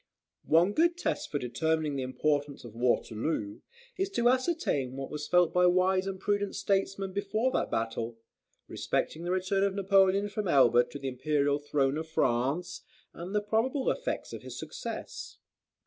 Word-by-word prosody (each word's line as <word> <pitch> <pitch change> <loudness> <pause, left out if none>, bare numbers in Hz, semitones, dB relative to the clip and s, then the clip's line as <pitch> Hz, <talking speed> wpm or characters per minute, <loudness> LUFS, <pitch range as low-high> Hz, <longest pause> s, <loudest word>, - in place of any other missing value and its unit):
One 170 +5 +4
good 340 +5 +3
test - - -2
for 145 - -1
determining 155 +3 -1
the 135 - -2
importance 145 +2 -1
of 120 -3 -10
Waterloo, 115 -1 -1 0.4
is 385 +1 0
to 240 -5 +3
ascertain 255 - 0
what 135 0 -5
was 150 0 -5
felt 180 -2 +3
by 180 0 +5
wise 185 +1 +2
and 190 -1 -4
prudent 205 0 -1
statesmen 195 -1 -1
before 215 +5 0
that - - 0
battle, 115 0 -2 0.5
respecting 165 +2 -2
the 175 - -1
return 185 +1 0
of 200 -1 +1
Napoleon 195 0 +3
from 205 0 -3
Elba 120 -5 +5
to - - -9
the 135 -1 -5
Imperial 145 +2 0
throne 145 0 0
of 160 - -5
France, 135 +5 0 0.3
and 180 +4 -7
the 210 - +3
probable 240 +6 +1
effects - - -4
of - - -6
his - - -8
success. - - -7
175 Hz, 165 wpm, -29 LUFS, 140-200 Hz, 0.5 s, by